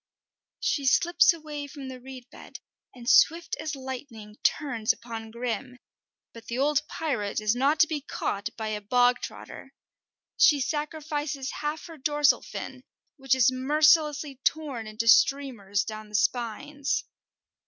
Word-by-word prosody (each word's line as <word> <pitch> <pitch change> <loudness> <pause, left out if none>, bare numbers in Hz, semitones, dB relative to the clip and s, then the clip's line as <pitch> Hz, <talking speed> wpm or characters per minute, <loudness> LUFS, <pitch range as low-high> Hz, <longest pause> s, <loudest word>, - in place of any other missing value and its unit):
She 280 -3 0
slips 345 +7 +5
away 300 -3 -6
from 275 -1 -9
the 260 -1 -8
reed 255 -1 -11
bed, - - -11 0.4
and 240 -1 -11
swift 325 +4 +4
as 310 -1 -4
lightning 255 -5 -8
turns 240 -8 +1
upon 225 -2 -7
Grim, 245 +2 -4 0.6
but 230 -1 -13
the 235 - -4
old 280 +1 +2
pirate 245 -12 -2
is 215 +1 +1
not 280 +5 +2
to 320 - +6
be 310 -2 -3
caught 205 -7 -3
by 220 -1 -3
a 210 -1 -3
bog 245 +4 +3
trotter. - - -9 0.7
She 290 - +6
sacrifices 295 -1 -3
half 300 +1 -4
her 330 -1 -10
dorsal 295 +1 +3
fin, 260 -1 -7 0.4
which 270 -2 +2
is 260 0 +4
mercilessly 295 +1 +2
torn 280 -8 -1
into 215 +2 -4
streamers 230 -6 +3
down 215 -1 -7
the 210 - -7
spines. 250 +6 -1
265 Hz, 145 wpm, -27 LUFS, 235-295 Hz, 0.7 s, to